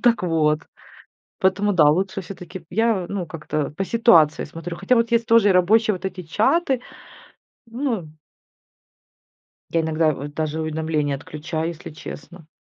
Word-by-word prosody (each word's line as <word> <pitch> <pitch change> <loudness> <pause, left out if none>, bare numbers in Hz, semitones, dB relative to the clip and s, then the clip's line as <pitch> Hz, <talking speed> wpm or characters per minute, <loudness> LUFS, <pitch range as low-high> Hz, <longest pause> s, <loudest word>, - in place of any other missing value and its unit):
Так 240 -4 +3
вот. 155 -3 +2 0.8
Поэтому, 195 +2 +2
да, 150 -4 +6
лучше 190 +4 0
всё-таки 180 -2 -9
я, 220 -3 +1
ну, 195 -3 -3
как-то 155 -3 -4
по 195 - 0
ситуации 175 -11 +4
смотрю. 165 +3 -7
Хотя 255 - +2
вот 230 0 +1
есть 235 0 +2
тоже 225 -3 +5
рабочие 215 +4 +4
вот 185 +1 -6
эти 185 -1 -4
чаты. 255 - +1 0.9
Ну 230 - -3 1.6
Я 165 -1 +1
иногда 160 -1 +1
вот 145 +1 -8
даже 155 0 -2
уведомления 155 -2 -1
отключаю, 155 +3 -4
если 170 -1 -7
честно 160 +2 -10
175 Hz, 140 wpm, -22 LUFS, 155-215 Hz, 1.6 s, да